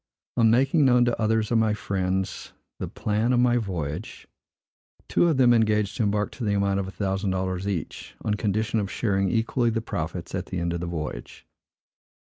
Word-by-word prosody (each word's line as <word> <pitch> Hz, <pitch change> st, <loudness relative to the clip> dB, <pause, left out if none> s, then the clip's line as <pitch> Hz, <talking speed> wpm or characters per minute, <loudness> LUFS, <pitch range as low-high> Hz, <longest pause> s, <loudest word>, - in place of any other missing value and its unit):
On 115 Hz, -1 st, +4 dB
making 135 Hz, +7 st, +3 dB
known 125 Hz, -2 st, +5 dB
to 120 Hz, -1 st, -1 dB
others 110 Hz, 0 st, +1 dB
of 115 Hz, -, +4 dB
my 110 Hz, -1 st, +2 dB
friends 95 Hz, -2 st, -2 dB, 0.3 s
the -, -, -3 dB
plan 110 Hz, +3 st, -1 dB
of 120 Hz, -, +3 dB
my 120 Hz, 0 st, +4 dB
voyage, 85 Hz, -10 st, -4 dB, 0.8 s
two 175 Hz, -, +3 dB
of 160 Hz, -5 st, +2 dB
them 125 Hz, -2 st, +6 dB
engaged 105 Hz, -2 st, +2 dB
to -, -, 0 dB
embark 105 Hz, -1 st, 0 dB
to 125 Hz, -, -7 dB
the 105 Hz, -2 st, +1 dB
amount 100 Hz, 0 st, +1 dB
of 95 Hz, -, -3 dB
a -, -, -6 dB
thousand 95 Hz, 0 st, -2 dB
dollars 95 Hz, 0 st, -2 dB
each, 90 Hz, -7 st, -4 dB
on 105 Hz, -, +1 dB
condition 110 Hz, +2 st, 0 dB
of 100 Hz, -2 st, -2 dB
sharing 100 Hz, -4 st, 0 dB
equally 115 Hz, +2 st, +1 dB
the 115 Hz, 0 st, 0 dB
profits 90 Hz, -5 st, -5 dB
at 95 Hz, 0 st, -3 dB
the 95 Hz, -, -4 dB
end 85 Hz, 0 st, -1 dB
of 85 Hz, -, -2 dB
the 90 Hz, -, -4 dB
voyage. 75 Hz, -7 st, -6 dB
105 Hz, 195 wpm, -25 LUFS, 95-115 Hz, 0.8 s, them